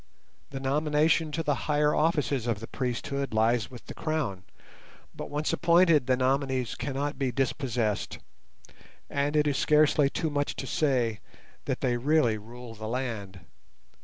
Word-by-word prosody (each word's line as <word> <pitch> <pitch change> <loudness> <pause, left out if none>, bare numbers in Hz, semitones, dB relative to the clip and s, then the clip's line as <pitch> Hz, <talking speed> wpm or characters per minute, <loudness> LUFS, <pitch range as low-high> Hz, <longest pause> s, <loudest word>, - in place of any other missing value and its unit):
The 135 - -5
nomination 150 +3 +2
to 165 - -1
the 150 - +1 0.2
higher 150 0 +3
offices 145 -6 +1
of 115 -4 0
the 115 - -6
priesthood 130 +1 -3
lies 115 0 +2
with 125 -2 -12
the - - -8
Crown, 150 - -2 0.7
but - - -6
once 150 +1 -1
appointed 170 -5 +4
the 130 -1 +3
nominees 130 -2 0
cannot 140 +2 -3
be 135 -2 0
dispossessed, 120 -4 -1 0.9
and 145 +1 0
it 150 0 +4
is 145 -2 +1
scarcely 150 -2 +4
too 160 +2 -2
much 145 0 -1
to - - -5
say 125 -7 +1 0.5
that - - -2
they 120 -2 +1
really 125 -4 +2
rule 120 +2 -10
the 110 0 -7
land. 110 -6 -4
135 Hz, 150 wpm, -28 LUFS, 120-150 Hz, 0.9 s, appointed